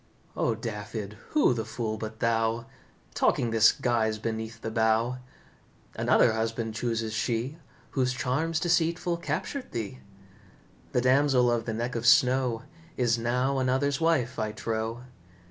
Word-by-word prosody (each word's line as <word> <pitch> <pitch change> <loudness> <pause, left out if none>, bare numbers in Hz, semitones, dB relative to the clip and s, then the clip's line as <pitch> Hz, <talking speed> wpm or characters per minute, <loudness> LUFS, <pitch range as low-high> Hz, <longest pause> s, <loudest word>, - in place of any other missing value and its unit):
"O, 115 - +1
Dafydd, 105 -2 -5 0.2
who 300 - +4
the 115 -2 -2
fool 110 0 -3
but 110 0 -7
thou, 115 0 +1 0.5
Talking 120 - +1
this 110 -1 +6
guise 110 -3 0
beneath 110 +1 -4
the 115 - -4
bough? 110 +3 +1 0.8
Another - - +4
husband 115 0 -2
chooses 115 -1 -2
she, 120 +7 -2 0.3
Whose 130 -2 +1
charms 145 +6 -1
deceitful 170 0 +1
captured 255 +9 -4
thee. 115 +2 -4 0.9
The 125 - +2
Damsel 130 -1 +4
of 115 -1 0
the 115 - -2
neck 120 +3 -2
of 115 0 -1
snow 125 -1 +4 0.3
Is 120 -2 +2
now 125 +3 0
another's 130 +3 +1
wife, 135 -7 +1
I 110 -1 -2
trow. 110 +2 -3
120 Hz, 135 wpm, -28 LUFS, 110-130 Hz, 0.9 s, this